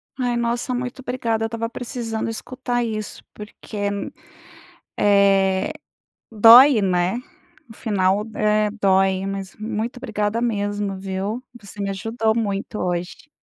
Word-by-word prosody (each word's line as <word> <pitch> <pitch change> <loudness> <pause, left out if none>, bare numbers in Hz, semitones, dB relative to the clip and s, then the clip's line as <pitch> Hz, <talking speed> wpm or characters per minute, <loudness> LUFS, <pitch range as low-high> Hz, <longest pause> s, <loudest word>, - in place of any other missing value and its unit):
Ai, 245 -2 -1
nossa, 235 +2 -1
muito 250 +1 -4
obrigada, 235 -3 -2
eu - - 0
estava 230 0 -4
precisando 230 -2 -4
escutar 245 +1 -3
isso, 215 -2 -5
porque, 210 -1 -5 1.1
eh, 195 +3 +3 0.6
dói, 230 +3 +8
né? 185 +3 +1 0.5
O - - -11
final, 200 -1 +1
eh, 210 0 +2
dói, 190 -1 +3
mas 195 -1 -5
muito 220 +3 -4
obrigada 215 -1 -2
mesmo, 205 -3 -1
viu, 195 +5 -4 0.2
você 205 0 -11
me 200 - -1
ajudou 220 +3 -1
muito 205 -1 -2
hoje. 175 +5 -3
215 Hz, 120 wpm, -22 LUFS, 195-235 Hz, 1.1 s, dói